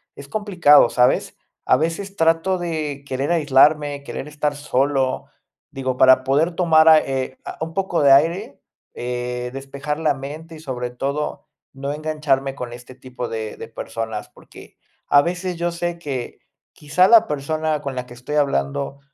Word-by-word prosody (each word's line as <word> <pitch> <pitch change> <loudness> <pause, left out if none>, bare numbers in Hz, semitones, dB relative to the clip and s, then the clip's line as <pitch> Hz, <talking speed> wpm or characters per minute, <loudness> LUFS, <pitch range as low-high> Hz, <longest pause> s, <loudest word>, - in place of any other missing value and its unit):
es 140 0 -11
complicado, 175 - +4
¿sabes? 125 0 +2 0.3
A - - +5
veces 190 +5 -3
trato 165 +3 +2
de 155 -5 -4
querer 135 +5 -2
aislarme, 145 -1 +3
querer 140 - -6
estar 150 -1 -2
solo, 135 -2 0 0.5
digo, 130 -1 -3
para 130 0 +6
poder 145 +6 +2
tomar 160 -3 +4
ai 155 -1 +7
eh, 130 -1 -3
a - - -7
un 160 0 -4
poco 190 -4 0
de 140 - +6
aire, 165 +6 +2 0.3
eh, 125 0 -4
despejar 140 +2 -5
la 155 -3 +2
mente 155 +4 -8
y, - - -11
sobre 125 -5 -4
todo, 140 +4 -4 0.3
no 140 +1 -4
engancharme 150 -3 -1
con 120 -3 -6
este 125 +1 -12
tipo 125 -2 -7
de 110 -1 -5
de - - -8
personas. 110 -2 -6
Porque - - -16 0.3
a 145 - +6
veces 180 +1 -3
yo 170 0 -1
sé 170 0 -4
que 135 -6 -5 0.3
quizá 155 +5 +2
la 225 0 +6
persona 155 +1 -2
con 140 -2 -5
la 125 0 -4
que 120 - -12
estoy 125 +5 -6
hablando 140 - -1
145 Hz, 165 wpm, -21 LUFS, 130-160 Hz, 0.5 s, ai